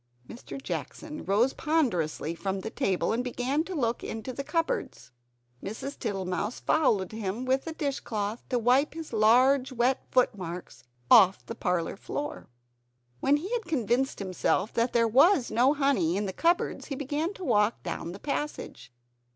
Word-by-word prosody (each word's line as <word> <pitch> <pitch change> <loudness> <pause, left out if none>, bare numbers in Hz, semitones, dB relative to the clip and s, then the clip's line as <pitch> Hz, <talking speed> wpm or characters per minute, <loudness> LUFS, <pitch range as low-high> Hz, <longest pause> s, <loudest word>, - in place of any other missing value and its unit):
Mr. 245 - -9
Jackson 305 +3 -6
rose 220 +7 +2
ponderously 180 - 0
from 190 +2 -3
the 220 - -5
table, 190 +2 0
and 240 +2 0
began 255 +4 -1
to 370 +2 -6
look 235 -5 -1
into 225 +3 -5
the 275 - -4
cupboards. 330 - -2 0.5
Mrs. 250 +7 -6
Tittlemouse 195 0 -2
followed 215 - +2
him 220 +2 -4
with 265 +4 0
a - - -2
dishcloth, 230 -8 -3
to 250 - +1
wipe 255 +6 +2
his 325 -5 -7
large 255 +5 +4
wet 250 +1 +1
footmarks 180 - -1 0.3
off 190 +1 +7
the - - -5
parlor 180 -6 -1
floor. 290 - -5 0.7
When 285 +2 +3
he 365 +8 -6
had 470 -2 -1
convinced 260 - 0
himself 195 +2 -1
that 235 +1 +1
there 230 -1 +4
was 275 - +4
no 260 +5 +4
honey 240 - +2
in 205 - -1
the 190 - -4
cupboards, 340 - 0
he 275 - -4
began 290 +5 -2
to 375 - -8
walk 215 -6 +2
down 170 -1 -4
the 190 - -9
passage. 280 - -4
245 Hz, 160 wpm, -28 LUFS, 200-280 Hz, 0.7 s, off